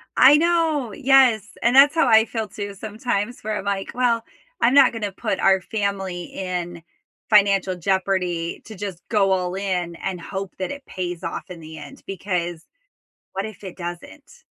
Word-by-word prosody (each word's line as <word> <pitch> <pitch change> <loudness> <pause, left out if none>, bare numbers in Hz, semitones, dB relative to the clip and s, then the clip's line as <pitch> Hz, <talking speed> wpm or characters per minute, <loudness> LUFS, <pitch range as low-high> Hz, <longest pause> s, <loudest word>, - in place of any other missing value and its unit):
I 280 +3 +8
know, 320 -8 +1
yes, 250 -4 +4
and 240 +2 +2
that's 280 +2 +8
how 325 -4 +3
I 220 -1 +6
feel 225 -2 -4
too 205 0 -6
sometimes 215 +2 -3
where 215 0 -2
I'm - - -8
like, 200 -1 -2
well, 235 -2 +1 0.4
I'm 245 - +4
not 280 -2 +7
gonna 210 -3 -3
put 195 -1 -3
our 190 -1 +4
family 195 -4 -3
in 175 -2 -5 0.5
financial 195 -3 +4
jeopardy 180 -2 -1
to 220 - -10
just 190 -3 -6
go 200 -3 +3
all 180 -1 0
in 180 -3 -2
and 185 0 -4
hope 190 +2 -5
that 185 - -3
it 280 -1 -8
pays 175 -1 -5
off - - -5
in 180 - -8
the 160 0 -10
end, 275 - -11
because 175 -3 -3 0.7
what 195 +1 -2
if 215 -2 -10
it 190 -3 -8
doesn't? 185 - -9
200 Hz, 175 wpm, -22 LUFS, 180-230 Hz, 0.7 s, I